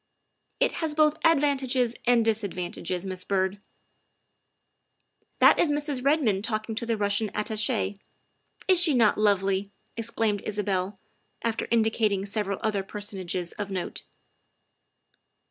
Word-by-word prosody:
" - - -51
It - - +3
has 315 -2 0
both 305 -1 +4
advantages 270 -6 +2
and 240 -2 +4
disadvantages, 185 -4 -2
Miss 185 -1 -1
Byrd." 190 0 -1 0.9
" - - -47
That - - +7
is 335 - +3
Mrs. 290 -3 0
Redmond 265 -9 +2
talking 215 0 -2
to 230 +2 -3
the 230 -1 0
Russian 205 +1 +1
At 210 - -1
tache. 215 -2 0 0.7
Is 370 -2 +5
she 320 -6 +4
not 220 -4 +3
lovely?" 195 -1 +1 0.3
exclaimed 225 -3 -1
Isabel, 200 -2 -2 0.5
after 230 -1 -1
indi 225 -1 +3
cating 200 -4 0
several 200 -1 -2
other 210 -3 0
personages 190 -3 -3
of 205 -1 -3
note. 185 -2 -4
215 Hz, 130 wpm, -26 LUFS, 195-240 Hz, 0.9 s, That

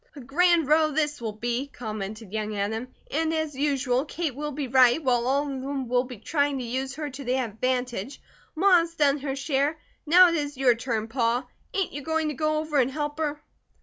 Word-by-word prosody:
"A - - -9
grand 325 +4 +3
row 310 +1 +4
this 295 -2 -1
will 225 -2 -2
be," 240 +5 -2
commented 215 -4 -6
young 215 -1 -2
Adam. 220 +4 -2 0.2
"And 320 +2 0
as 315 -2 -1
usual 270 -2 +1
Kate 315 -1 -3
will 295 +3 -4
be 285 -1 -4
right, 255 +4 +5
while 245 -2 +2
all 275 +2 +2
of 275 -3 -4
them 270 -1 -3
will 250 +1 +2
be 250 -2 -9
trying 285 +5 0
to 255 - -4
use 260 +3 -3
her 300 -1 -4
to 275 +2 -8
their 255 0 0
advantage. 250 +1 -2 0.4
Ma 365 +1 +6
has 335 0 -3
done 290 -2 +3
her 270 -1 -3
share. 280 +2 0 0.3
Now 360 +3 +8
it - - -1
is 290 -3 -2
your 260 -2 +5
turn, 230 -2 -3
Pa. 235 +1 0 0.3
Ain't 390 -3 0
you 290 - -5
going 320 +1 0
to - - -3
go 310 +2 0
over 305 -2 0
and 255 -1 +3
help 295 +2 -4
her?" 300 -1 -2
275 Hz, 215 wpm, -26 LUFS, 245-300 Hz, 0.4 s, Now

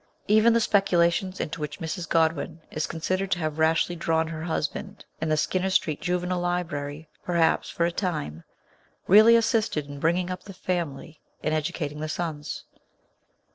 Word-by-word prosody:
Even 215 +2 +5
the 230 - +4
speculations 185 -3 +2
into 155 +1 -4
which 150 -1 -5
Mrs. 165 +1 -4
Godwin 160 0 +1
is 155 +1 -2
considered 185 +4 -2
to 180 - +1
have 155 -2 -3
rashly 165 +2 +2
drawn 160 -1 0
her 160 -1 -5
husband 160 -2 -3 0.2
in 160 - -1
the 155 - +2
Skinner 185 +5 0
Street 155 -5 +1
Juvenile 180 0 -1
Library, 160 -4 -3 0.2
per 175 - -3
haps, 165 -1 +2
for 170 - 0
a 170 - 0
time, 155 - -3 0.6
really 215 +4 +8
assisted 225 - +1
in 145 0 -9
bringing 175 +4 +1
up 180 - -5
the 195 - -10
family 160 -4 -4 0.2
and 155 - 0
educating 150 -1 -2
the 155 0 -3
sons. 155 -3 -4
165 Hz, 165 wpm, -26 LUFS, 155-180 Hz, 0.6 s, really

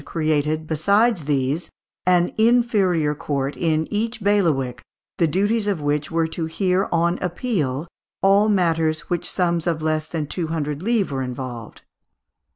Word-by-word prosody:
created, 155 -1 -1
besides 200 +4 +2
these, 145 +3 -1 0.4
an 180 -1 +3
inferior 215 -9 +3
court 140 -1 -3
in 160 -2 0
each 225 +3 -1
bailiwick, 150 -12 +1 0.4
the 170 - +4
duties 205 +6 +1
of 200 -5 0
which 145 0 -1
were 165 -1 +1
to 160 0 -3
hear, 185 +3 0
on 170 +1 +1
appeal, 170 - -2 0.4
all 200 +2 +5
matters 165 -5 +1
in - - -21
which 175 -1 -1
sums 170 -2 0
of 165 -2 0
less 155 0 -1
than 160 -3 -3
two 165 +3 -3
hundred 150 -2 -3
livres 215 -4 +1
were 135 -1 -2
involved 125 -3 -6
(Fig. - - -39
165 Hz, 155 wpm, -22 LUFS, 150-195 Hz, 0.4 s, all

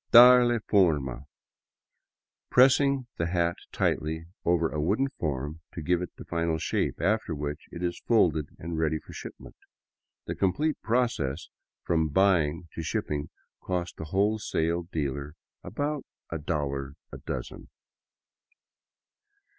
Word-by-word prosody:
" - - -48
Darle 120 0 +8
forma'' 70 - +2 0.6
— - - -56 0.3
pressing 135 +1 +5
the 85 - 0
hat 85 -1 +1 0.2
tightly 80 +1 -1 0.2
over 85 -1 +3
a 75 -1 -3
wooden 110 - +1
form 75 +1 -3
to 85 - -4
give 90 +2 +2
it 90 - -4
the - - -10
final 85 -1 0
shape, - - -1
after 100 0 +1
which 75 +1 -5
it 85 +1 -6
is 85 0 -2
folded 80 -10 +3
and 80 0 -4
ready 80 -1 +1
for - - -12
shipment. - - -9 0.7
The - - -3
complete 145 +12 0
process 110 - 0 0.3
from 80 -2 +1
buying 85 -2 +2
to - - -4
shipping 75 -2 -2 0.3
costs 90 -1 -2
the 80 - -6
wholesale 85 -3 0
dealer 70 0 -3 0.3
about 145 0 -2 0.3
a 85 - -2
dollar 70 -3 -2 0.2
a - - -8
dozen. - - -6
85 Hz, 130 wpm, -28 LUFS, 75-100 Hz, 0.7 s, Darle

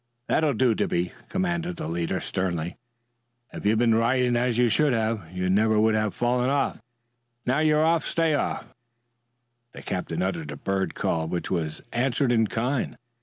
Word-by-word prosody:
"That'll 150 -4 +2
do, 125 0 +3
Dippy!" 90 -4 -1 0.2
commanded 175 -1 -1
the - - -5
leader 85 0 -1
sternly. 85 -3 -2 0.8
"If - - -3
you'd 110 +1 +3
been 115 0 +4
riding 120 +2 +2
as 120 -1 +1
you 120 0 +4
should 135 +5 +3
have, 110 -7 -1
you 90 0 -2
never 105 +3 +3
would 110 +1 +4
have 110 -2 0
fallen 125 +1 +1
off. 140 -4 0 0.6
Now 130 +4 +2
you're 155 0 +3
off, 165 0 +2
stay 165 -2 +1
off." 145 - -2 1.0
The - - -10
captain 90 -1 -2
uttered 85 -5 -2
a 75 - -6
bird 95 +2 -2
call 80 -1 -1
which 85 +1 -3
was 80 -4 -2
answered 125 +1 +1
in 110 -2 +3
kind. 125 +5 -2
115 Hz, 170 wpm, -26 LUFS, 90-130 Hz, 1.0 s, been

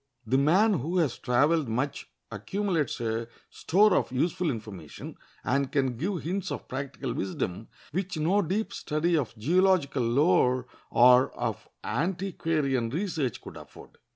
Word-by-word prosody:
The 130 - +2
man 185 +6 +4
who 165 +8 -2
has 155 -9 +1
traveled 145 +3 +2
much 130 +6 -2 0.2
accumulates 165 - -2
a 115 0 -2 0.2
store 205 +4 +3
of - - 0
useful 165 +6 0
information, 105 - -7 0.3
and 140 0 0
can 130 -3 0
give 175 - -3
hints 185 +3 -2
of - - -5
practical 135 -1 -4
wisdom 95 +1 -3 0.2
which 185 +2 -3
no 175 +7 +2
deep 200 +5 -2
study 165 +3 0
of 125 -7 -2
geological 165 - +2
lore 130 0 +3 0.2
or 125 +2 +6
of - - -4
antiquarian 155 -5 -1
research 155 - -2
could - - -10
afford. - - -14
145 Hz, 135 wpm, -28 LUFS, 125-180 Hz, 0.3 s, or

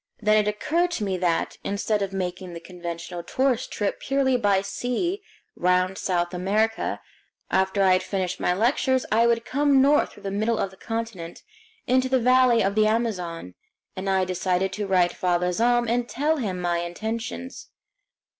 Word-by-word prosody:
Then 215 -1 +3
it 210 -1 +2
occurred 330 +12 0
to 220 - -2
me 195 -2 -1
that, 175 -2 0
instead 205 +1 -1
of 195 -1 -2
making 185 -1 -4
the - - -6
conventional 170 0 -7
tourist 255 +6 0
trip 205 -1 -2
purely 270 -1 +1
by 200 -5 +2
sea 250 - -2 0.3
round 180 +1 +1
South 175 -1 -1
America, 210 +5 0 0.5
after 190 +1 +2
I 190 -1 +5
had 185 - +2
finished 185 -1 -3
my - - +1
lectures 255 +6 +1
I 230 +2 +4
would 230 0 +1
come 285 0 +3
north 285 +3 +3
through - - -16
the 195 - -3
middle 215 +3 0
of 195 - -2
the - - -15
continent 225 -7 -5 0.4
into 260 0 +2
the 260 - +3
valley 250 -1 +4
of 195 +1 +1
the 215 +1 +3
Amazon; 180 - -2 0.4
and 190 +1 -3
I 190 -1 +2
decided 185 +1 -1
to 210 -1 -3
write 180 -2 +3
Father 180 0 0
Zahm 240 +5 +2
and 240 +1 0
tell 305 +4 0
him 195 -9 -3
my 175 -1 0
intentions. 220 +8 -5
205 Hz, 175 wpm, -24 LUFS, 185-240 Hz, 0.5 s, I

